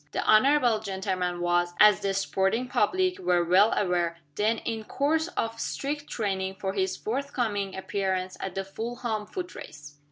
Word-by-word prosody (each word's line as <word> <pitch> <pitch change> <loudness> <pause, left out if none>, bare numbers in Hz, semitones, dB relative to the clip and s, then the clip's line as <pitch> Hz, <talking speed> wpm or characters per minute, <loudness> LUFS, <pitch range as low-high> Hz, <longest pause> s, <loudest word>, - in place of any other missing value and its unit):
The - - -1
honorable 245 0 +4
gentleman 190 -3 -2
was, 175 0 +1
as 210 -1 +7
the 195 -1 -1
sporting 195 +5 0
public 370 +6 +1
were 175 - +2
well 190 +5 +5
aware, 175 -3 0 0.2
then 215 +7 +1
in 225 -1 -4
course 310 +8 0
of 225 0 -2
strict 290 +4 -3
training 190 -3 -2
for 190 0 -3
his 190 -1 -1
forthcoming 225 -6 -2
appearance 190 -1 -2
at 190 - -5
the 195 - -1
Fulham 220 +1 -4
Foot 360 -2 -6
Race. 145 0 -11
205 Hz, 155 wpm, -27 LUFS, 190-240 Hz, 0.2 s, as